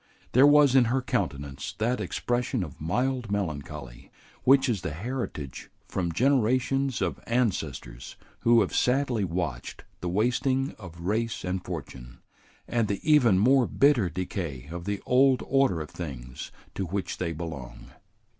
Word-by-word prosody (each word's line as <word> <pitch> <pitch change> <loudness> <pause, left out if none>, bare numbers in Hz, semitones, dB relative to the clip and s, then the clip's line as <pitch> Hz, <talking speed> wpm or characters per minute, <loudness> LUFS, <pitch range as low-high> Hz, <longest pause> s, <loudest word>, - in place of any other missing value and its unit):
There 130 +4 +7
was 145 -2 +6
in 130 -2 +6
her 125 +4 +1
countenance 70 - -3
that 120 +3 0
expression 120 -2 -1
of 75 -4 -9
mild 125 +7 -1
melancholy 75 -9 -4 0.4
which 135 +1 +6
is 110 -7 0
the - - -4
heritage 95 - -5 0.2
from 85 -3 -2
generations 130 - +2
of - - -2
ancestors 80 - -2 0.2
who 115 0 +5
have - - -1
sadly 125 -4 +2
watched 85 -9 -4 0.2
the 90 - -3
wasting 125 +7 +1
of 85 -4 -10
race 110 +5 -1
and 90 0 -2
fortune, 65 -7 -7 0.5
and 115 -2 +1
the 100 -1 -2
even 135 -10 +5
more 125 +5 +4
bitter 135 -10 +3
decay 85 -6 -4
of 85 0 -6
the 100 0 -3
old 130 0 +4
order 135 -11 +2
of 75 - -7
things 65 -7 -7 0.2
to 95 - -3
which 95 +3 -3
they 85 -2 -1
belong. 75 -7 -7
100 Hz, 145 wpm, -27 LUFS, 80-125 Hz, 0.5 s, There